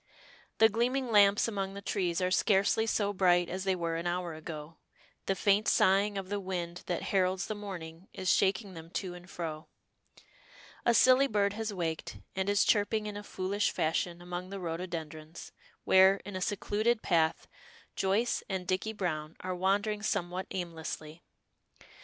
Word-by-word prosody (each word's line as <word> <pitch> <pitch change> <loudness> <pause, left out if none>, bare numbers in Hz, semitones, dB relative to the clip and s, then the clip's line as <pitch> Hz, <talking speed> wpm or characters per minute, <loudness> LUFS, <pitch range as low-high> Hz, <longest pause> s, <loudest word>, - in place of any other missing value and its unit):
The 220 - +7
gleaming 240 +3 0
lamps 205 0 +5
among 195 -3 -3
the - - -5
trees 180 -3 -1
are 180 0 +1
scarcely 200 +3 +3
so 205 -2 +1
bright 175 -2 +3
as 185 +1 -4
they 190 -1 +2
were 165 -2 -2
an 170 +1 -3
hour 175 -1 -2
ago, 155 0 -8 0.5
the 195 - +1
faint 200 +2 +2
sighing 200 +2 +3
of 190 -1 -4
the 205 0 -1
wind 175 -2 -4
that 175 - -2
heralds 185 0 +2
the - - -3
morning 180 -4 -8
is 185 - -6
shaking 195 0 +1
them 165 -1 -10
to 185 -3 -4
and 180 +1 -12
fro. 160 -2 -5 1.2
A 235 - +5
silly 260 +3 +6
bird 205 -3 +1
has 220 0 -3
waked, 165 -5 -3 0.2
and 190 +1 -1
is 205 -1 +3
chirping 210 +1 +2
in 210 -1 -5
a 205 - -5
foolish 200 0 -1
fashion 170 +2 -1
among 180 +1 -5
the 195 0 -6
rhododendrons, 165 -2 -6 0.3
where, 190 +1 +6
in 200 -1 -7
a 185 - -3
secluded 215 +4 0
path, 160 -2 +1 0.5
Joyce 205 +5 +1
and 190 -2 -2
Dicky 190 +4 -1
Browne 155 -6 -3
are 185 0 -3
wandering 200 +3 0
somewhat 185 -3 -2
aimlessly. 165 -2 -6
190 Hz, 165 wpm, -31 LUFS, 175-205 Hz, 1.2 s, The